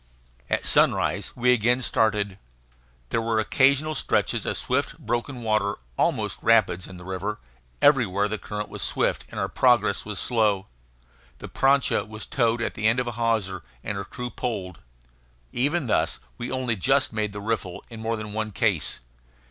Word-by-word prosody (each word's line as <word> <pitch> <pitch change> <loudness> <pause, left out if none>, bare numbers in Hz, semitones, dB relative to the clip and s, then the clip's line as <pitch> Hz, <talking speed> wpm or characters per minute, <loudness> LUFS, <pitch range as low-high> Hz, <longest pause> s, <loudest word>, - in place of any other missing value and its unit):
At - - 0
sunrise - - +3
we 125 +1 +4
again 125 +2 +2
started. 105 -5 +1 0.7
There 115 - 0
were 115 0 0
occasional 140 +7 +3
stretches - - 0
of - - -1
swift, - - -1
broken 120 +2 -3
water, 110 -2 +1 0.2
almost - - 0
rapids, 110 -6 +3
in 95 - -10
the 90 - -11
river; 95 +3 -3 0.5
everywhere 105 -9 +4
the 110 0 -3
current 105 0 -5
was - - -8
swift, - - 0
and - - -6
our - - 0
progress 120 -5 +3
was 105 -2 -5
slow. 105 -4 +1 0.7
The - - -9
prancha 135 -6 +3
was 110 0 -7
towed 120 -2 +1
at - - -2
the 110 - 0
end 115 +3 +3
of 125 - 0
a 120 - -3
hawser, 110 -5 -1 0.2
and 105 - -3
her 100 - -3
crew 125 +4 -6
poled. 95 -8 -4 0.7
Even 145 +5 +1
thus 115 - 0 0.2
we 120 - -5
only 130 -3 0
just 135 +6 +2
made 105 -1 -1
the 105 - -6
riffle 100 -4 -3
in 115 - -8
more 115 +1 -1
than 105 -1 -6
one 110 0 -2
case. 100 -6 0
110 Hz, 170 wpm, -25 LUFS, 105-125 Hz, 0.7 s, we